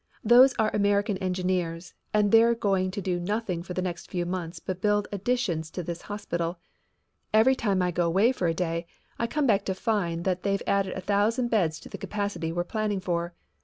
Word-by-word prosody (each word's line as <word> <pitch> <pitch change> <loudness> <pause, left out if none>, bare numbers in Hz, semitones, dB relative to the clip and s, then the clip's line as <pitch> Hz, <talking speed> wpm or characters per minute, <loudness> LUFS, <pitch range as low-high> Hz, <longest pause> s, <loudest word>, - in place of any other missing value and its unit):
"Those 250 +4 +7
are 215 -1 +1
American 205 0 +2
engineers 180 -2 -2 0.2
and 210 -1 +2
they're 230 +1 +6
going 195 -4 +1
to 195 +1 -5
do 180 -1 -1
nothing 195 -1 -2
for 180 +1 -7
the 185 - -1
next 175 -2 -5
few 175 -1 -2
months 175 -1 -4
but 185 +2 -5
build 205 0 +2
additions 200 -6 -1
to 180 - -5
this 170 0 -5
hospital. 175 -4 -3 0.8
Every 225 +5 +6
time 200 -7 +1
I 180 - +1
go 175 0 +1
'way 200 +8 +4
for 190 -9 -1
a 165 - +1
day 170 -1 -2 0.3
I 235 - 0
come 300 +4 0
back 205 -5 +3
to 190 - -1
find 180 -6 -1
that 185 -1 0
they've 200 0 -1
added 195 -1 0
a - - -4
thousand 210 +6 +1
beds 175 -9 +1
to - - -11
the - - -8
capacity 200 -6 -3
we're 175 +1 -1
planning 210 +1 -2
for. 170 -1 -2
190 Hz, 200 wpm, -27 LUFS, 175-210 Hz, 0.8 s, Those